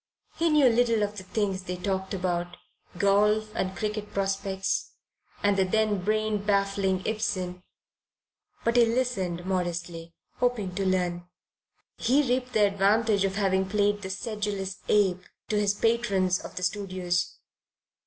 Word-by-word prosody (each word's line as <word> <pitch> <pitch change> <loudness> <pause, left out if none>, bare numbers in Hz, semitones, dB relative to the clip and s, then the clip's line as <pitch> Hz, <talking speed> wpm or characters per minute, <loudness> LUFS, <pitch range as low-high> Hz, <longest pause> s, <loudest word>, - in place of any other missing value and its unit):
He 335 0 +1
knew 300 -3 +5
little 230 -2 +3
of 205 0 -2
the 190 - -6
things 195 -1 -1
they 180 0 -5
talked 190 +1 -2
about, 175 -1 -2 0.4
golf 210 +3 +3
and 190 0 -2
cricket 210 +1 -3
prospects, 195 0 -1 0.5
and 205 0 +3
the 190 - +4
then 210 0 +1
brain 215 +1 +1
baffling 195 -2 +1
Ibsen, 185 -4 -2 1.0
but 230 +1 +2
he 240 - +7
listened 205 -8 -1
modestly, 175 -2 -3 0.2
hoping 230 -7 0
to 195 +1 -1
learn. 175 -2 0 0.7
He 275 +3 +2
reaped 250 0 -1
the 215 -1 +5
advantage 200 +1 +2
of 195 0 -2
having 190 -2 +1
played 205 0 +1
"the 190 - -5
sedulous 200 -2 -3
ape" 190 -3 +3 0.3
to 210 - +1
his 205 -1 +2
patrons 200 -5 +1
of - - -10
the 185 - -4
studios. 185 -2 -1
200 Hz, 140 wpm, -27 LUFS, 185-215 Hz, 1.0 s, he